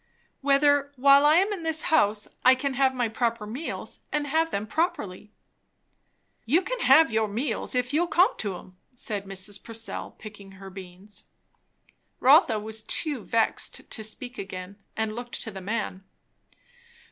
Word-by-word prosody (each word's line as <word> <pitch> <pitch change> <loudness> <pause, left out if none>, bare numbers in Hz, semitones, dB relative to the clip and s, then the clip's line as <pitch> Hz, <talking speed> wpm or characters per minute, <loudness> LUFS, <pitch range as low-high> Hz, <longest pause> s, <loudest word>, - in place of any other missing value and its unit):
"Whether, 285 0 +3
while 280 +2 +6
I 305 - +6
am 390 +4 +3
in 385 - -5
this 320 -1 +1
house, 210 -9 +2 0.2
I 255 +1 +7
can 275 +1 -2
have 265 0 +3
my 245 -2 0
proper 230 -1 -1
meals, 250 +10 -6
and 295 -1 -1
have 320 +3 +1
them 205 -7 -3
properly." 210 - -2 1.1
"You 315 +11 +2
can - - -4
have 310 - +6
your 220 -1 +1
meals, 240 +5 -2
if 250 +2 0
you'll 340 +4 +2
come 360 +2 +3
to 200 -4 -3
'em," 185 0 -15 0.2
said 210 -4 -5
Mrs. 195 +1 -4
Purcell, 225 0 -6
picking 205 -2 -11
her 195 0 -11
beans. 190 +2 -10 0.9
Rotha 265 - +6
was 220 +1 -5
too 285 +1 0
vexed 230 -1 -1
to 220 - -5
speak 245 +4 -6
again, 190 0 -7 0.2
and 220 -1 -1
looked 240 +1 -5
to 225 - -6
the 190 -1 -8
man. 200 -1 -3
230 Hz, 160 wpm, -26 LUFS, 205-285 Hz, 1.1 s, I